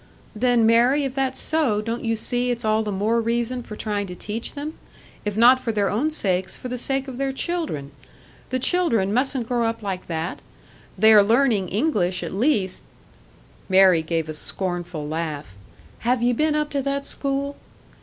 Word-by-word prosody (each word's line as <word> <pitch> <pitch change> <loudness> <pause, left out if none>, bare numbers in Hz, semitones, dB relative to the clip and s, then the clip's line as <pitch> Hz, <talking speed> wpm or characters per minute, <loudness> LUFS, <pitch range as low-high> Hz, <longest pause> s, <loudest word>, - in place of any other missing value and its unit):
"Then, 240 0 +3
Mary, 240 +6 +4
if 270 -2 -2
that's 265 -1 -1
so, 295 -10 +1
don't 230 +2 -3
you 225 -1 0
see 245 +2 -1
it's 240 -2 -2
all 215 0 +2
the 215 -1 -3
more 215 +4 +1
reason 235 +2 -1
for 215 - -9
trying 205 -2 -2
to 180 - -7
teach 215 +5 -5
them? 295 +2 -5 0.5
If 210 0 -2
not 245 +3 +7
for 235 - -2
their 205 -3 0
own 255 +9 +1
sakes, 190 - -1
for 250 - -7
the 250 - -3
sake 270 +2 -1
of 260 -2 -7
their 275 0 0
children! 270 - -3 0.6
The 255 - 0
children, 245 - +1
mustn't 255 -1 0
grow 240 -2 +1
up 225 -1 -4
like 190 -2 -4
that! 165 0 -4 0.6
They 220 +3 +6
are 210 - +9
learning 220 -3 +2
English, 190 - 0
at 170 - -5
least 200 -4 +1 0.5
" - - -29
Mary 190 -3 +6
gave 160 0 -2
a 155 - -4
scornful 175 -1 -3
laugh. 150 -7 -4 0.4
"Have 240 +1 +1
ye 245 0 +3
been 305 +5 +1
up 300 0 -1
to 280 - 0
that 275 +1 -2
school?" 280 0 -2
230 Hz, 185 wpm, -23 LUFS, 195-265 Hz, 0.6 s, are